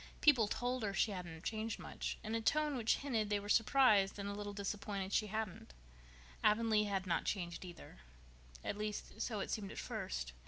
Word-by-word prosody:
People 255 -8 +6
told 245 +4 -1
her 200 -3 -1
she 210 - +3
hadn't 175 -4 -6
changed 220 +1 -2
much, - - -4
in 220 - -3
a 230 - +1
tone 300 +5 +2
which 230 -3 +3
hinted 230 -7 -1
they 205 -1 +2
were 200 - -8
surprised 215 -3 +5
and 200 0 -4
a 200 - -2
little 205 0 -4
disappointed 200 -1 -3
she 215 - +3
hadn't. 210 - -4 0.7
Avonlea 215 0 +4
had 195 -2 -1
not 170 -2 +1
changed, 175 -4 -2
either. 175 -2 -10 0.7
At 205 - -3
least, 210 0 -4
so 215 -4 -1
it - - -3
seemed 200 -3 -2
at - - -9
first. - - -3
210 Hz, 190 wpm, -37 LUFS, 195-225 Hz, 0.7 s, People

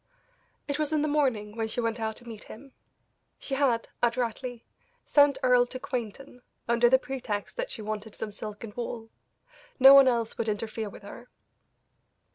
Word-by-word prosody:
It 285 0 -2
was 305 -1 -1
in 305 -1 +1
the - - +1
morning 255 -9 0
when 225 -1 -2
she 220 - -3
went 230 0 -1
out 220 -1 -2
to 240 - -14
meet 225 -2 -9
him; 265 +4 -12 0.6
she 275 - -5
had, 265 -4 +1
adroitly, 240 0 -1 0.4
sent 285 -2 +4
Earle 250 -1 +4
to 255 - -7
Quainton, 250 +1 -6 0.3
under 235 +1 +4
the 260 - +6
pretext 255 -6 -5
that - - -2
she 220 - -7
wanted 215 0 -5
some 215 - -5
silk 210 +1 -8
and 215 -2 -8
wool; 230 -1 -6 0.7
no 270 +1 +10
one 275 -1 +8
else 235 -3 0
would 225 - 0
interfere 215 0 -3
with 200 - -13
her. 235 +4 -11
235 Hz, 175 wpm, -28 LUFS, 220-265 Hz, 0.7 s, no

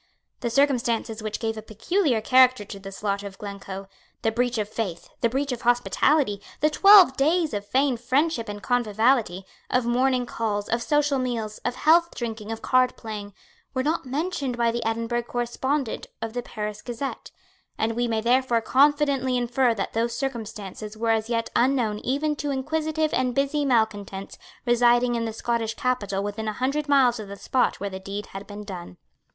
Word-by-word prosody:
The 240 - -2
circumstances 235 -4 +1
which 215 0 -4
give 225 -1 -2
a - - -5
peculiar 240 - 0
character 255 -2 +5
to 200 0 -8
the 195 0 -9
slaughter 200 0 -3
of 195 -1 -11
Glencoe, 195 -1 -7 0.4
the 225 - +2
breach 245 +1 0
of 210 -1 -1
faith, 205 -6 -5
the 235 - +3
breach 275 +3 -1
of 245 -1 -4
hospitality, 245 -1 +2 0.2
the 305 - +2
twelve 390 -5 +8
days 315 +2 +2
of 205 -1 -4
feigned 260 +1 +1
friendship 260 -1 +1
and 205 0 -7
conviviality, 225 -4 +1 0.2
of 250 -1 +1
morning 250 +1 +2
calls, 210 -4 -2
of 235 +1 0
social 295 +1 +2
meals, 230 -4 -3
of 245 - -3
healthdrinking, 240 -10 +1
of 225 - -6
cardplaying, 220 -5 0 0.4
were 260 - +1
not 305 -1 -1
mentioned 280 -2 -2
by 235 -1 +2
the 235 0 -3
Edinburgh 230 +1 -1
correspondent 245 +2 -2
of 225 -1 -5
the 245 - -2
Paris 210 -2 -5
Gazette; 245 +3 -5 0.5
and 220 +1 0
we 240 0 0
may 225 -1 0
therefore 245 0 +2
confidently 275 +1 +3
infer 245 0 +2
that 195 - -3
those 235 +1 -1
circumstances 220 -4 -5
were 225 +1 +1
as 220 0 0
yet 230 -1 -1
unknown 240 -4 +2
even 295 +5 -1
to 290 - -3
inquisitive 310 +3 -1
and 255 -1 0
busy 280 +1 +1
malecontents 205 -6 -1 0.3
residing 240 0 +4
in 230 -1 -1
the 225 - -2
Scottish 225 0 -2
capital 205 -6 -1
within 205 +2 -4
a 215 - -1
hundred 280 +6 -1
miles 255 -4 +4
of 215 - -7
the 200 - -7
spot 255 +5 0
where 200 0 -4
the 190 - -6
deed 200 +2 -5
had 195 +1 -7
been 205 0 -8
done. 180 - -8
235 Hz, 175 wpm, -25 LUFS, 215-265 Hz, 0.5 s, twelve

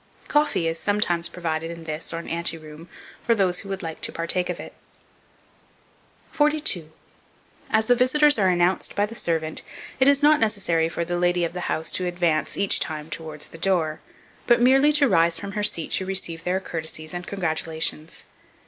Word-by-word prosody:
Coffee 295 - +1
is 165 0 -1
sometimes 175 -5 0
provided 165 -2 -3
in 170 -1 -8
this, 155 0 -3
or 165 - -4
an 170 - -7
ante 165 0 -1
room, 155 +2 -12 0.3
for 230 - +3
those 185 -4 +1
who 195 - -10
would 195 -1 -4
like 160 -1 -6
to - - -2
partake 175 +2 -2
of - - -3
it. - - -9 1.6
42. 295 - +1 0.8
AS 220 0 +2
THE 245 - +5
VISITORS 260 +2 +4
ARE 190 -2 +4
ANNOUNCED 180 +1 +1
BY 205 - +2
THE 215 - -9
SERVANT, 160 -6 -1 0.4
it 265 - +4
is 280 +1 +4
not 300 0 +6
necessary 190 -7 +1
for 170 +1 -3
the 175 +1 -2
lady 175 0 +2
of 170 - -5
the 180 -1 -4
house 160 +1 -1
to 180 - -1
advance 175 -3 0
each 200 -1 +3
time 155 0 -3
towards 155 -2 -6
the 165 - -12
door, 165 -4 +1 0.5
but 240 -1 +5
merely 270 +4 +5
to 290 -1 +4
rise 170 -5 +3
from 200 -1 -6
her 210 +1 -3
seat 190 -6 0
to 190 - +2
receive 170 -4 -2
their 185 +1 +1
courtesies 160 -3 -4
and 175 0 -6
congratulations. 160 -3 -2
175 Hz, 185 wpm, -24 LUFS, 165-210 Hz, 1.6 s, not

